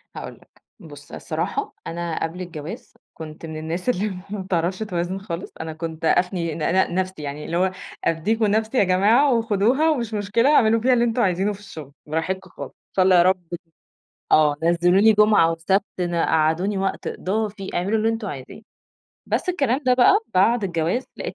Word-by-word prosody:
هاقول -, -, -7 dB
لك. -, -, -24 dB, 0.2 s
بُص -, -, -13 dB
الصراحة 420 Hz, 0 st, -4 dB
أنا 170 Hz, -1 st, -3 dB
قبل 165 Hz, +3 st, -4 dB
الجواز 165 Hz, -3 st, -8 dB, 0.2 s
كنت 155 Hz, 0 st, -9 dB
من 160 Hz, -1 st, -7 dB
الناس 165 Hz, +7 st, -3 dB
اللي 210 Hz, -3 st, 0 dB, 0.2 s
ما 205 Hz, 0 st, -4 dB
بتعرفش 185 Hz, 0 st, -1 dB
توازن 185 Hz, -3 st, -3 dB
خالص، 185 Hz, -3 st, -6 dB
أنا 160 Hz, 0 st, -5 dB
كنت 160 Hz, 0 st, -6 dB
أفني 175 Hz, -1 st, +1 dB
ن -, -, -6 dB
ن 170 Hz, +3 st, +1 dB
نفسي 185 Hz, -3 st, -2 dB
يعني 145 Hz, +1 st, -6 dB
اللي 170 Hz, -, -2 dB
هو 185 Hz, +1 st, +2 dB, 0.3 s
أدّيكم 215 Hz, +8 st, +1 dB
نفسي 220 Hz, +4 st, 0 dB
يا -, -, +5 dB
جماعة 210 Hz, +9 st, +4 dB
وخدوها 230 Hz, +6 st, +2 dB
ومش 240 Hz, -8 st, -1 dB
مشكلة 210 Hz, +5 st, +1 dB
اعملوا 225 Hz, -2 st, +4 dB
فيها 255 Hz, +2 st, +3 dB
اللي 240 Hz, -1 st, +3 dB
أنتم 240 Hz, +1 st, 0 dB
عايزينه 195 Hz, +1 st, +1 dB
في 200 Hz, -, -12 dB
الشغل، 155 Hz, -9 st, -10 dB
براحتكم 180 Hz, +5 st, -3 dB
خالص، -, -, -9 dB
إن -, -, -50 dB
شا 190 Hz, -, +3 dB
الله 185 Hz, 0 st, +5 dB
يا 175 Hz, -, +7 dB
رب 185 Hz, +1 st, +3 dB
ت -, -, -2 dB, 0.8 s
آه 150 Hz, -1 st, +5 dB
نزلوني 175 Hz, +6 st, +4 dB
جُمعة 210 Hz, -6 st, +4 dB
وسَبت 180 Hz, +5 st, +1 dB, 0.2 s
ن 175 Hz, -1 st, -1 dB
قعّدوني 165 Hz, +4 st, +1 dB
وقت 195 Hz, 0 st, -2 dB
إضافي، 205 Hz, 0 st, -3 dB
اعملوا 195 Hz, +5 st, 0 dB
اللي 220 Hz, +1 st, +1 dB
أنتم 225 Hz, -1 st, -3 dB
عايزينه. 140 Hz, +4 st, -8 dB, 0.7 s
بس -, -, -1 dB
الكلام 275 Hz, -8 st, +1 dB
ده 250 Hz, -, +5 dB
بقى 250 Hz, -1 st, +5 dB, 0.2 s
بعد 220 Hz, +4 st, +3 dB
الجواز 175 Hz, +7 st, -1 dB
لقيت -, -, -5 dB
190 Hz, 185 wpm, -22 LUFS, 170-220 Hz, 0.8 s, يا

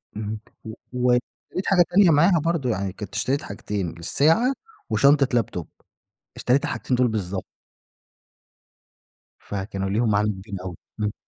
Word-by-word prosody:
اهم 105 Hz, 0 st, -4 dB, 0.2 s
و 110 Hz, -, -7 dB, 0.2 s
واشتريت 125 Hz, +8 st, -1 dB
حاجة 180 Hz, -3 st, +5 dB
تانية 190 Hz, -1 st, +5 dB
معاها 165 Hz, +3 st, +5 dB
برضه، 165 Hz, -7 st, 0 dB
يعني 100 Hz, -3 st, -1 dB
كنت 105 Hz, +1 st, -8 dB
اشتريت 135 Hz, +5 st, 0 dB
حاجتين 100 Hz, -2 st, -4 dB
الساعة، 165 Hz, -, +3 dB, 0.4 s
وشنطة 140 Hz, +5 st, +4 dB
لابتوب 95 Hz, -8 st, -1 dB, 0.7 s
اشتريت 135 Hz, +3 st, +2 dB
الحاجتين 125 Hz, -, -1 dB
دول 125 Hz, -1 st, +4 dB
بالضبط. 100 Hz, -4 st, -3 dB, 2.0 s
فكانوا 95 Hz, -1 st, -4 dB
ليهم 110 Hz, +3 st, +1 dB
معاني 105 Hz, +1 st, +2 dB
جامدين 100 Hz, -1 st, -6 dB
أوي 90 Hz, -2 st, -5 dB, 0.2 s
امم. 105 Hz, -1 st, -1 dB
110 Hz, 130 wpm, -24 LUFS, 100-140 Hz, 2.0 s, حاجة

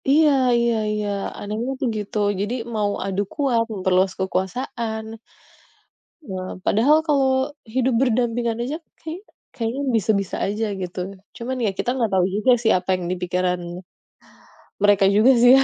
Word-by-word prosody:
Iya 305 Hz, +2 st, +6 dB, 0.3 s
iya 235 Hz, 0 st, +2 dB, 0.2 s
iya. 210 Hz, 0 st, -2 dB, 0.3 s
Anehnya 215 Hz, +5 st, -3 dB
tuh 260 Hz, -, 0 dB
gitu. 210 Hz, 0 st, -4 dB, 0.2 s
Jadi 205 Hz, +4 st, -1 dB, 0.2 s
mau 205 Hz, -1 st, +1 dB
adu 195 Hz, 0 st, -1 dB
kuat, 260 Hz, -6 st, +2 dB
memperluas 185 Hz, -1 st, +2 dB
kekuasaan. 220 Hz, +4 st, -2 dB, 1.3 s
Eee, 185 Hz, -1 st, -4 dB
padahal 270 Hz, +9 st, +4 dB
kalau 265 Hz, -2 st, +2 dB, 0.2 s
hidup 255 Hz, +3 st, 0 dB
berdampingan 240 Hz, -2 st, +1 dB
aja, 270 Hz, +6 st, -2 dB, 0.2 s
kayaknya 330 Hz, +6 st, -7 dB, 0.3 s
kayaknya 240 Hz, +2 st, -3 dB
bisa-bisa 200 Hz, -2 st, +1 dB
saja 210 Hz, +3 st, -1 dB, 0.2 s
gitu. 180 Hz, 0 st, -5 dB, 0.4 s
Cuman 255 Hz, +2 st, -4 dB
ya -, -, +2 dB
kita -, -, -1 dB
enggak 230 Hz, -5 st, 0 dB
tahu 185 Hz, -1 st, +4 dB
juga 215 Hz, +5 st, +3 dB
sih 225 Hz, -, +2 dB
apa 180 Hz, +1 st, -7 dB
yang 180 Hz, -1 st, -5 dB
di -, -, 0 dB
pikiran 180 Hz, 0 st, 0 dB, 1.2 s
mereka 205 Hz, -1 st, +5 dB
juga 210 Hz, +6 st, +5 dB
sih 245 Hz, +2 st, +8 dB
ya? 270 Hz, -, +5 dB
225 Hz, 145 wpm, -22 LUFS, 195-255 Hz, 1.3 s, sih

